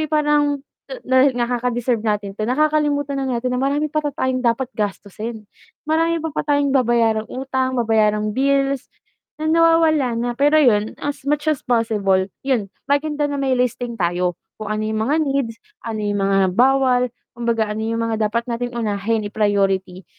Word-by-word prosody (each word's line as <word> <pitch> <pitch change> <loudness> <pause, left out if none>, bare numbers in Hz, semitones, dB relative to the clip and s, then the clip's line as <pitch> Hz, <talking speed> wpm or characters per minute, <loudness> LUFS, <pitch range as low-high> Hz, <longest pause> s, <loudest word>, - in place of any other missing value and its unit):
eh, 310 - -2
parang 295 -2 +1 0.4
na 260 +2 +4
na 240 - +1
kakadeserve 245 -1 -1
natin 210 -2 -2
'to 215 +2 -4
nakakalimutan 290 0 +1
na 265 - -2
natin 250 +2 -2
na 250 - -1
marami 290 +2 0
pala 305 -1 0
tayong 260 -2 -1
dapat 245 +1 0
gastusin, 215 +1 -5 0.4
marami 330 +2 +1
pala 315 -2 -2
tayong 285 -1 +2
babayarang 230 -4 +2
utang, 260 0 -2
babayarang 215 -2 +2
bills, 275 +1 +1 0.5
na 310 +1 -1
nawawala 325 -6 +3
na, 240 +1 -1
pero 285 +5 +3
'yun, 220 -8 +3
as 290 0 -4
much 295 0 0
as 310 -3 +1
possible 210 -6 +1 0.2
'yun, 240 -8 -1 0.2
maganda 295 +1 0
na 285 - -3
may 275 -1 0
listing 245 -2 -1
tayo, 175 +1 +1 0.2
kung 215 -1 -4
ano 215 - -2
yung 220 0 -2
mga 290 +4 +2
needs, 270 -5 -2 0.2
ano 225 -2 -4
yung 205 -1 -1
mga 195 0 +2 0.2
bawal, 250 -1 +3 0.2
kumbaga 235 -2 0
ano 215 - -4
yung 225 +1 -2
mga 220 -1 0
dapat 235 +2 -1
nating 245 +1 -3
unahin, 215 0 -1
i-priority 195 -3 0
245 Hz, 165 wpm, -20 LUFS, 220-280 Hz, 0.5 s, na